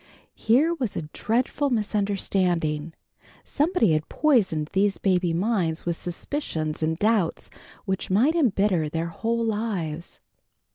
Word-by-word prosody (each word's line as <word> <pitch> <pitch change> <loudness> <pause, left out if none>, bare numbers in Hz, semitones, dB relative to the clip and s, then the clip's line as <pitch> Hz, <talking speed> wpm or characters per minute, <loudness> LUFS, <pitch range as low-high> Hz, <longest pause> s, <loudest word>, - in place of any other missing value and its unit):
Here 275 +10 +3
was 260 - -3
a - - -3
dreadful 255 +5 0
misunderstanding. 190 - 0 0.5
Somebody 295 - +1
had 155 0 -1
poisoned 195 - +2
these 195 +1 +2
baby 180 -3 +1
minds 175 -3 0
with 170 -1 0
suspicions 165 - -4
and 160 0 0
doubts 210 -4 0 0.3
which 190 -2 -2
might 235 +12 +3
embitter 200 - +2
their 165 +2 -2
whole 230 +6 -1
lives. 195 -8 -3
195 Hz, 115 wpm, -25 LUFS, 165-230 Hz, 0.5 s, Here